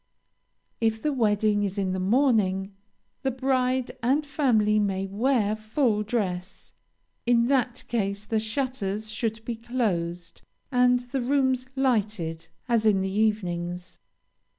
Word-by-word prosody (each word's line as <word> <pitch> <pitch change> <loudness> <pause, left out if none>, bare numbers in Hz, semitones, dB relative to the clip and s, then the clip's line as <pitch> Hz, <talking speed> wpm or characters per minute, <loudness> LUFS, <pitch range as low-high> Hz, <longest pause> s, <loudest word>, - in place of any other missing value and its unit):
If 225 -1 +1
the 300 +4 -1
wedding 210 -3 +2
is 200 0 -2
in 190 -2 0
the 185 - -2
morning, 200 -3 +2 0.5
the 270 - 0
bride 255 -1 0
and 270 +6 +2
family 220 -8 +2
may 195 -2 0
wear 215 +1 +1
full 215 0 0
dress; 195 -5 -3 0.5
in 235 -1 +4
that 255 -2 +1
case 200 -3 -2
the 220 0 0
shutters 220 -3 -2
should 225 0 -3
be 235 - -3
closed 180 -8 -2 0.3
and 250 -1 +4
the 250 +2 -3
rooms 260 0 +1
lighted 210 -11 0 0.2
as 235 -3 +2
in 205 -3 +3
the 190 0 -2
evenings. 180 -4 -1
220 Hz, 130 wpm, -26 LUFS, 200-250 Hz, 0.5 s, in